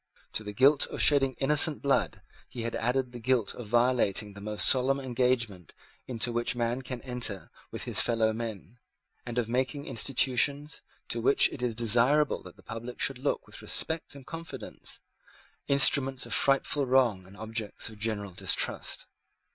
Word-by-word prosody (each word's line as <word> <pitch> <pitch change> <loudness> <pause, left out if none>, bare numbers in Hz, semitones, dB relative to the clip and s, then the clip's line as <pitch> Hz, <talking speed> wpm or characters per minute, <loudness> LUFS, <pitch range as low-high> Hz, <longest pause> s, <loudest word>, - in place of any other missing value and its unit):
To 110 - -3
the 105 - -6
guilt 135 +7 +4
of - - -7
shedding 135 -2 +4
innocent 150 +2 +2
blood 140 -1 0 0.3
he 120 - -6
has 115 - -3
added 125 +2 -1
the 120 - -8
guilt 120 -2 0
of 120 - -9
violating 120 -3 +1
the 100 - -11
most 105 0 +1
solemn 135 +1 +3
engagement 120 - -1 0.3
into 120 -1 -2
which 120 +1 0
man 120 +1 -1
can 125 -2 -7
enter 120 -6 -3 0.2
with - - -6
his - - +3
fellow 110 -2 +1
men, 115 0 -7 0.5
and 120 0 -5
of 120 -3 0
making 130 +4 -2
institutions, 140 +4 +1 0.3
to - - -1
which 410 -1 +4
it 130 - -9
is 120 -3 -1
desirable 120 +6 +3
that - - -13
the - - -20
public 115 +2 -8
should 135 -2 +1
look 140 - -2
with - - -12
respect 160 -2 -1
and 135 -2 -12
confidence, 165 +1 -7 0.7
instruments 135 -1 +3
of - - -5
frightful 135 0 +1
wrong 120 -8 +2
and 100 +2 -15
objects 110 0 -4
of 110 - -14
general 105 -3 -3
distrust. 90 - -2
125 Hz, 165 wpm, -28 LUFS, 115-135 Hz, 0.7 s, guilt